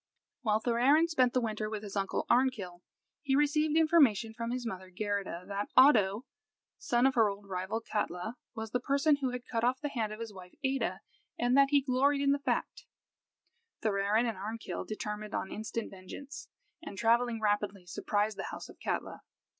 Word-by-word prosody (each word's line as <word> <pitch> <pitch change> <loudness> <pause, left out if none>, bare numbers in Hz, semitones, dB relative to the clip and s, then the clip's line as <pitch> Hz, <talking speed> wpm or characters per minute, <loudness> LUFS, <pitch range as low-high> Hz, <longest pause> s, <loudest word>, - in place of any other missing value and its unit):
While 215 -4 +2
Thorarin 255 +8 +3
spent 255 -6 +3
the 255 - +2
winter 215 -2 -2
with 215 -1 -5
his 205 -1 -7
uncle 195 -1 -1
Arnkill, 220 -9 +1 0.4
he 275 -3 +1
received 300 +2 +2
information 275 -10 +4
from 230 +1 -4
his 245 0 -3
mother 190 -4 -6
Geirrida 195 -2 -3
that 200 0 -3
Oddo, 230 -4 +6 0.5
son 240 +1 +2
of 270 - +4
her 225 -4 +4
old 200 0 -7
rival 190 +4 -3
Katla, 210 0 -3 0.2
was 220 -1 -5
the 250 - +1
person 280 +3 +2
who 270 -2 -1
had 250 0 -6
cut 230 -1 -2
off 250 +2 +2
the 295 - -3
hand 225 -6 -2
of 215 - -7
his 225 -2 -6
wife 180 -2 -12
Ada, 270 0 -1 0.4
and 245 +1 +2
that 275 0 +6
he 285 -1 +4
gloried 275 +2 +2
in 280 0 +3
the 285 - +2
fact. 260 -4 -2 1.0
Thorarin 210 +2 +2
and 225 -5 -3
Arnkill 220 +3 -5
determined 210 0 -5
on 190 - -3
instant 220 +1 -4
vengeance, 200 +10 -9 0.3
and, 285 -12 -8
travelling 235 +1 +2
rapidly, 205 -3 -1
surprised 205 +4 -1
the - - -3
house - - -8
of - - -14
Katla. - - -3
230 Hz, 180 wpm, -31 LUFS, 205-265 Hz, 1.0 s, Oddo